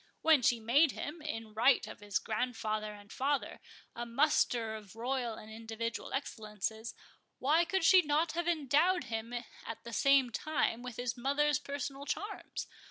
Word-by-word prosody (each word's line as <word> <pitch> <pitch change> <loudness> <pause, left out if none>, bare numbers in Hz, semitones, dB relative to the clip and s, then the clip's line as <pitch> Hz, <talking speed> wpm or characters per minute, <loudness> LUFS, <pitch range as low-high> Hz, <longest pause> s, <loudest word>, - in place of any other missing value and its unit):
When 315 -4 +6
she 240 0 +3
made 265 +7 +4
him, 305 +3 -6
in 225 -8 -5
right 245 +5 +4
of - - -9
his 205 -2 -1
grandfather 215 -2 -2
and 205 0 -14
father, 280 +1 -1 0.4
a 235 - -3
muster 235 -3 +2
of 215 -2 -9
royal 240 0 -2
and 215 0 -11
individual 225 +1 -5
excellences, 220 -4 -4 0.4
why 315 +6 +3
could 380 +1 0
she 370 +2 +8
not 305 +1 +1
have 345 0 -2
endowed 335 +3 +3
him 225 0 -4 0.3
at 225 0 -7
the 235 - -8
same 275 +1 +4
time 250 -3 0
with 250 -2 -7
his 245 0 -2
mother's 290 +4 +1
personal 280 -1 -5
charms? 410 +1 -4
250 Hz, 160 wpm, -33 LUFS, 225-295 Hz, 0.4 s, she